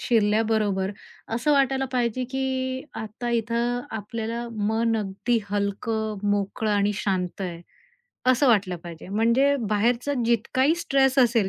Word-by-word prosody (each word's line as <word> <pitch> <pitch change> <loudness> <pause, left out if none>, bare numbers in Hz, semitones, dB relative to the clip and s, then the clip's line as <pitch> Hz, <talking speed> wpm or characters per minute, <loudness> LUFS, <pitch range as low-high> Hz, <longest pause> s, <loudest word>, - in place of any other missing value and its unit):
शिरल्याबरोबर 215 -3 +2 0.4
असं 255 +6 +2
वाटायला 270 -1 +2
पाहिजे, 245 0 0
की 260 0 -2 0.2
आता 220 +3 -5
इथं 235 +1 0 0.2
आपल्याला 230 +2 -4 0.2
मन 225 +1 +1
अगदी 210 +4 0
हलकं, 210 +2 -1
मोकळं, 205 +2 -1
आणि 205 0 +2
शांत 190 -3 -2
आहे, 175 -3 -4 0.7
असं 255 +2 +4
वाटलं 195 -6 +3
पाहिजे. 170 0 -9
म्हणजे 235 +7 +3 0.2
बाहेरचा 240 +6 +1
जितकाही 255 +6 +2
स्ट्रेस 275 -5 +2
असेल 235 -5 +4
230 Hz, 120 wpm, -25 LUFS, 205-255 Hz, 0.7 s, असं